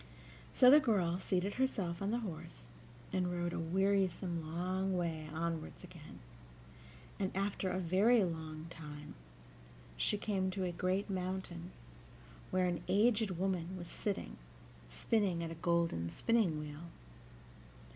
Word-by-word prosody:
So 250 -1 +7
the 295 - +10
girl 185 - +1
seated 190 +1 0
herself 195 -10 -1
on 200 - 0
the 235 +2 0
horse, - - -7 0.4
and 180 -1 +1
rode 175 -1 -1
a - - -2
wearisome 185 0 +1
long 185 +2 0
way 160 -3 -2
onward 165 0 -2
again, - - -11 1.0
and 190 -2 +1
after 195 -1 0
a 185 - -1
very 195 +6 +4
long 160 -2 -4
time 150 -2 -8 0.8
she 210 - +2
came 195 -3 0
to 185 0 -2
a 180 - 0
great 185 +3 0
mountain, 185 -2 -3 0.8
where 185 0 +2
an 175 -2 -1
aged 210 -2 +3
woman 185 -1 -1
was 175 -1 -7
sitting, 205 -2 -3 0.5
spinning 175 - 0
at 165 - -4
a 165 0 -9
golden 170 - +1
spinning 205 - +2
wheel. 150 +2 -7
180 Hz, 135 wpm, -35 LUFS, 170-195 Hz, 1.0 s, the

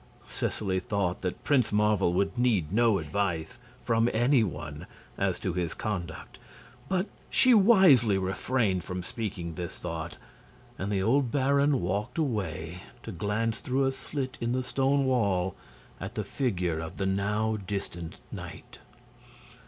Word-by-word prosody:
Seseley 95 -3 -1
thought 90 -1 -1
that 90 -2 -4
Prince 130 -6 +3
Marvel 105 -3 +3
would 100 +3 +1
need 110 -10 +1
no 115 -2 +4
advice 90 +4 -2 0.2
from 115 0 +2
any 120 +2 +4
one 80 -6 -5 0.3
as - - 0
to 90 - -2
his 85 -2 -2
conduct; 85 -7 -5 0.5
but 185 0 +1 0.2
she 255 -1 +5
wisely 190 - +6
refrained 95 0 0
from 90 +1 -4
speaking 90 -6 -4
this 85 +1 -5
thought, - - -5 0.6
and 100 +2 -2
the 95 -2 +1
old 125 +3 +2
baron 140 0 +3
walked 100 - -2
away 90 - -2 0.2
to - - -6
glance 110 +2 -1
through 130 +2 0
a 135 - +2
slit 130 0 -5
in 120 +1 0
the 130 0 0
stone 135 +2 +1
wall 100 -8 +1 0.4
at - - -6
the - - -1
figure 90 - -1
of 80 0 -6
the 95 - -1
now 105 +3 0
distant 85 -4 -5
knight. - - -9
105 Hz, 145 wpm, -28 LUFS, 90-125 Hz, 0.6 s, wisely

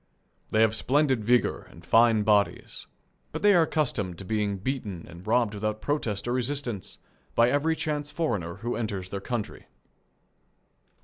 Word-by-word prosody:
They 110 - +2
have 110 -1 +4
splendid 135 -1 +2
vigour 120 +3 +1
and 85 +1 -15
fine 115 0 +5
bodies, 105 -1 +1 0.5
but - - -5
they 205 0 +7
are 175 - +6
accustomed 125 - -1
to 95 - -8
being 105 -1 -1
beaten 100 -5 -4
and 85 +3 -12
robbed 115 -1 +2
without 110 +1 -2
protest 115 -7 -2
or 120 - 0
resistance 125 -5 -3 0.4
by 120 +1 +4
every 155 +3 +2
chance 150 -2 -3
foreigner 110 - -2
who 120 +1 -3
enters 100 -5 -3
their 100 0 -5
country. 110 -2 -5
115 Hz, 150 wpm, -27 LUFS, 100-135 Hz, 0.5 s, they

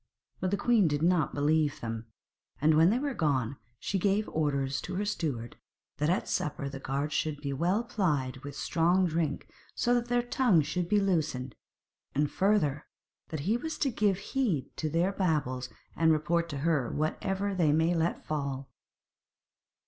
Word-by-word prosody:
But 185 - 0
the 200 - 0
queen 225 -6 +3
did 145 0 0
not 175 -4 +2
believe 150 0 +2
them, 115 0 -5 0.5
and 155 +2 +4
when 160 +3 +6
they 225 - +2
were 280 +1 -1
gone, 140 - 0 0.2
she 195 - -2
gave 205 +3 +1
orders 140 -3 0
to 185 - -5
her 205 +3 -1
steward 140 - -3 0.4
that 150 +1 +1
at 180 - +1
supper 145 -1 -2
the 135 -1 -6
guards 140 +3 -2
should 155 -2 -1
be 140 -1 -3
well 180 - +1
plied 150 - -1
with 140 +1 -8
strong 175 +5 +2
drink 160 -3 -1 0.3
so 245 - +2
that 240 -1 +1
their 245 0 +1
tongues 240 - +3
should 175 +1 -2
be 210 - +4
loosened, 155 - 0 0.6
and, 145 +1 +1
further, 175 -8 +1 0.4
that 155 -3 -4
he 205 +10 +1
was 320 +6 -5
to 275 - +1
give 205 -4 +2
heed 195 - -1
to 155 - -1
their 170 +5 +1
babble, 150 -10 0 0.3
and 165 -1 +4
report 170 +2 +1
to 145 - -4
her, 150 -8 +2
whatever 195 +6 -1
they 170 -5 +3
might 160 +3 +3
let 165 +1 -1
fall. 140 -3 -3
160 Hz, 170 wpm, -30 LUFS, 145-195 Hz, 0.6 s, when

